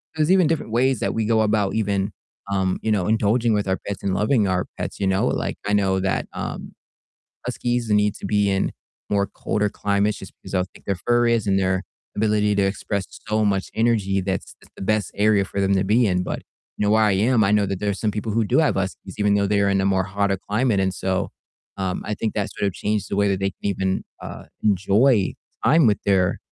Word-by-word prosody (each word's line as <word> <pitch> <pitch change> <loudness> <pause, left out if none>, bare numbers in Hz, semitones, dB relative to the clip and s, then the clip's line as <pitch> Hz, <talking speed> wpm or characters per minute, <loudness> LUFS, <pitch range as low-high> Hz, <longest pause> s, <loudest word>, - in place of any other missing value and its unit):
There's 155 +2 +2
even 185 -3 +5
different 150 -8 -2
ways 125 +1 +2
that - - -1
we 110 - 0
go 110 0 +3
about 105 -2 +1
even, 100 -2 0 0.4
um, 95 -1 0
you 110 - 0
know, 95 -4 +1
indulging 110 +2 +2
with 105 -2 -1
our 95 - +1
pets 100 - -5
and 95 - 0
loving 105 +1 +2
our 90 -1 0
pets, - - -5
you 100 - 0
know, 95 0 +2
like, - - -2
I 105 - +1
know 95 -2 +2
that, 95 0 -1
um, - - -6 0.7
huskies 120 -2 -2
need 105 0 +3
to - - -6
be 105 -1 +2
in 95 - 0 0.4
more 100 -1 +2
colder 105 +1 -1
climates 100 +1 0
just 95 - -10
'cause - - -9
of 90 - +3
how - - 0
thick - - -17
their 100 - +1
fur 120 0 +3
is 115 -3 +1
and 95 -1 +2
their 95 0 +1 0.3
ability 105 -1 +2
to 100 - +2
express 95 0 -2 0.2
so 110 0 +1
much 100 -2 0
energy, 110 -4 +1
that's 95 0 -3
that's - - -21
the - - -8
best 105 -1 0
area 105 -1 +3
for 100 +1 -4
them 100 0 +2
to 95 - +1
be 110 +5 +3
in, 90 -2 +1
but, - - -4 0.4
you - - -3
know, 105 - +2
where 110 +1 +4
I 105 - +3
am, 110 +4 +3
I 100 - +2
know 105 -1 +3
that 95 -1 -3
there 105 - -1
are 100 - -1
some 105 +2 -1
people 105 +1 -3
who 115 +1 +2
do 100 - +2
have 155 - +3
huskies 95 0 -4
even 105 -1 +3
though 100 0 +2
they're 100 0 +2
in 95 -1 +2
a 95 - +1
more 95 -1 +2
hotter 100 0 0
climate, 105 -1 +1
and 95 -1 +1
so, 95 0 -1 0.5
um, 95 -2 -2
I 105 - -2
think 110 - -3
that 100 -2 -1
sort 100 - -1
of 95 - -2
changed 105 -1 -2
the 100 - -1
way 100 0 +3
that 95 -1 0
they 95 0 0
can - - -26
even, 95 -1 -1 0.2
uh, - - -8 0.2
enjoy 100 +2 +3 0.3
time 160 -4 +5
with 105 - +3
their 95 -2 +2
100 Hz, 240 wpm, -22 LUFS, 95-110 Hz, 0.7 s, even